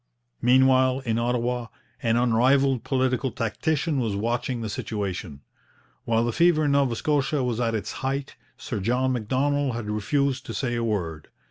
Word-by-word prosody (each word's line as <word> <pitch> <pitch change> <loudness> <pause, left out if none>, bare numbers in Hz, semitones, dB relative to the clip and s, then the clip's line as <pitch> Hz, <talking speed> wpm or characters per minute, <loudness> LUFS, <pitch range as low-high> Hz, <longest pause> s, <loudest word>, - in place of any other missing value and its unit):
Meanwhile, 130 +1 +4
in 115 -3 -1
Ottawa, 120 0 -1 0.3
an 115 0 +2
unrivalled 125 +2 +3
political 130 0 0
tactician 145 +7 -1
was 110 -5 -1
watching 120 +3 -2
the 110 - -3
situation. 100 -8 -4 0.6
While 115 0 +2
the 120 - 0
fever 170 -1 +3
in 145 - +2
Nova 140 -4 +2
Scotia 145 +1 0
was 120 -2 -1
at 115 -2 0
its 105 - -3
height, 135 +1 -3 0.2
Sir 110 - -4
John 125 +6 +1
Macdonald 130 +3 0
had 110 -3 -4
refused 130 +5 0
to - - -5
say 130 -4 -1
a 120 0 -1
word. 85 -8 -2
125 Hz, 155 wpm, -25 LUFS, 115-135 Hz, 0.6 s, Meanwhile